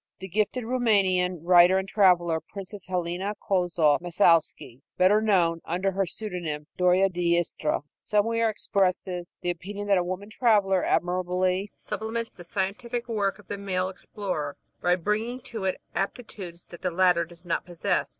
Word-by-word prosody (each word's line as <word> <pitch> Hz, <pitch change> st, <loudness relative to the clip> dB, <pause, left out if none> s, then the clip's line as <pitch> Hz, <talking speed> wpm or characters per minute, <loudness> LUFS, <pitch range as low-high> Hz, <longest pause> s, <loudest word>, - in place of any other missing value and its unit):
The 190 Hz, -, -8 dB
gifted 215 Hz, +6 st, 0 dB
Roumanian 195 Hz, -8 st, +1 dB
writer 180 Hz, +1 st, +6 dB
and 190 Hz, 0 st, -2 dB
traveler, 175 Hz, -5 st, +3 dB
Princess 195 Hz, +4 st, -10 dB
Helena 180 Hz, +3 st, -2 dB
Kolzoff 175 Hz, -5 st, +2 dB
Massalsky, 165 Hz, -8 st, +2 dB, 0.2 s
better 190 Hz, +4 st, +5 dB
known 175 Hz, -6 st, +2 dB
under 185 Hz, +3 st, -1 dB
her 195 Hz, 0 st, 0 dB
pseudonym, 175 Hz, -7 st, -5 dB
Doria 180 Hz, +1 st, +4 dB
d'Istria, 175 Hz, -3 st, 0 dB, 0.2 s
somewhere 225 Hz, +2 st, +1 dB
expresses 185 Hz, -3 st, -1 dB
the 175 Hz, -, 0 dB
opinion 200 Hz, +4 st, -6 dB
that 195 Hz, -2 st, +5 dB
a -, -, 0 dB
woman 185 Hz, +4 st, -5 dB
traveler 205 Hz, -6 st, +3 dB
admirably 185 Hz, +2 st, 0 dB
supplements 220 Hz, +2 st, -4 dB
the 175 Hz, -, -11 dB
scientific 230 Hz, +7 st, -3 dB
work 205 Hz, -4 st, 0 dB
of 210 Hz, -, -18 dB
the 205 Hz, -, -5 dB
male 185 Hz, -2 st, -1 dB
explorer 185 Hz, -6 st, -5 dB, 0.2 s
by 175 Hz, 0 st, +3 dB
bringing 215 Hz, +7 st, -2 dB
to 220 Hz, -4 st, -6 dB
it 190 Hz, -, -1 dB
aptitudes 195 Hz, -3 st, -5 dB
that 175 Hz, -, -10 dB
the 180 Hz, -, 0 dB
latter 180 Hz, -1 st, +3 dB
does 170 Hz, +1 st, -14 dB
not 170 Hz, -, -1 dB
possess. 175 Hz, -2 st, -1 dB
185 Hz, 150 wpm, -26 LUFS, 175-205 Hz, 0.2 s, writer